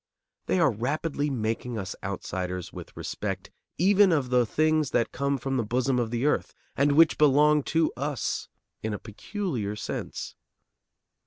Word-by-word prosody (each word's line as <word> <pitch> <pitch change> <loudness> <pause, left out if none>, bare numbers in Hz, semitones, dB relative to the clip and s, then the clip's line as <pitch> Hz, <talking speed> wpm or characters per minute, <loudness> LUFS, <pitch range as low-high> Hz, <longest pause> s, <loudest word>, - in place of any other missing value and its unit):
They 185 - +2
are 160 -5 +4
rapidly 145 +6 -1
making 115 -1 -2
us 95 -3 -4
outsiders 90 -2 -4
with - - -10
respect - - -4 0.3
even 195 +3 +5
of 140 -6 +1
the 125 -2 +4
things 155 +1 +2
that 115 - +1
come 140 +1 0
from 135 +1 -2
the 120 - +1
bosom 125 +3 +1
of 120 -2 0
the 120 +3 -1
earth, 150 - 0 0.2
and 140 +1 +3
which 160 +2 +5
belong 150 +1 +5
to 160 -1 +1
us 140 +1 -2 0.3
in 110 -1 -2
a - - -4
peculiar 115 - -4
sense. 105 - -5
135 Hz, 155 wpm, -27 LUFS, 115-150 Hz, 0.3 s, even